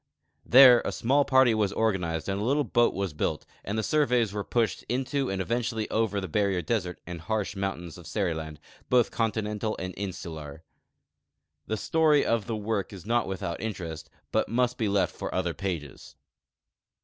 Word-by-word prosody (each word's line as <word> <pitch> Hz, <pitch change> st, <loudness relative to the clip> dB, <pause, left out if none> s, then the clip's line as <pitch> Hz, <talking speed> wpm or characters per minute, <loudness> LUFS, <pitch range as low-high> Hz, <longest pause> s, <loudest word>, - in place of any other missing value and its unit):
There 125 Hz, -1 st, +9 dB
a -, -, -2 dB
small 140 Hz, +4 st, +2 dB
party 130 Hz, -3 st, +5 dB
was 105 Hz, -3 st, +1 dB
organized 90 Hz, -8 st, -1 dB
and 100 Hz, +1 st, -1 dB
a -, -, -1 dB
little 140 Hz, +5 st, +2 dB
boat 120 Hz, -3 st, +2 dB
was 95 Hz, -4 st, -2 dB
built, 75 Hz, -, -2 dB, 0.2 s
and 105 Hz, +3 st, -3 dB
the 110 Hz, -, 0 dB
surveys 125 Hz, -7 st, +2 dB
were 105 Hz, -1 st, -2 dB
jmshed 115 Hz, -3 st, 0 dB
into 130 Hz, +2 st, -1 dB
and 95 Hz, -, -2 dB
eventually 115 Hz, +2 st, -1 dB
over 110 Hz, -2 st, +1 dB
the 95 Hz, -, -4 dB
barrier 95 Hz, +1 st, 0 dB
desert 95 Hz, -7 st, -2 dB
and 85 Hz, -1 st, -7 dB
harsh 105 Hz, +3 st, -2 dB
mountains 90 Hz, -3 st, -4 dB
of 85 Hz, -, -12 dB
Seriland, 80 Hz, -6 st, -2 dB, 0.3 s
both 125 Hz, -2 st, +3 dB
continental 110 Hz, -1 st, -1 dB
and 90 Hz, 0 st, -5 dB
insular. 80 Hz, -6 st, -6 dB, 1.0 s
The 110 Hz, -, -1 dB
story 155 Hz, +4 st, +3 dB
of 115 Hz, -3 st, 0 dB
the 115 Hz, -, -2 dB
work 105 Hz, -2 st, -2 dB
is 95 Hz, -3 st, -10 dB
not 120 Hz, +1 st, +1 dB
without 95 Hz, -3 st, -4 dB
interest, 85 Hz, -8 st, -5 dB, 0.2 s
but -, -, +1 dB
must 125 Hz, +1 st, 0 dB
he 110 Hz, -3 st, +1 dB
left 100 Hz, -1 st, +1 dB
for -, -, -5 dB
other 90 Hz, -2 st, 0 dB
pages. 80 Hz, -9 st, -5 dB
105 Hz, 175 wpm, -27 LUFS, 90-120 Hz, 1.0 s, There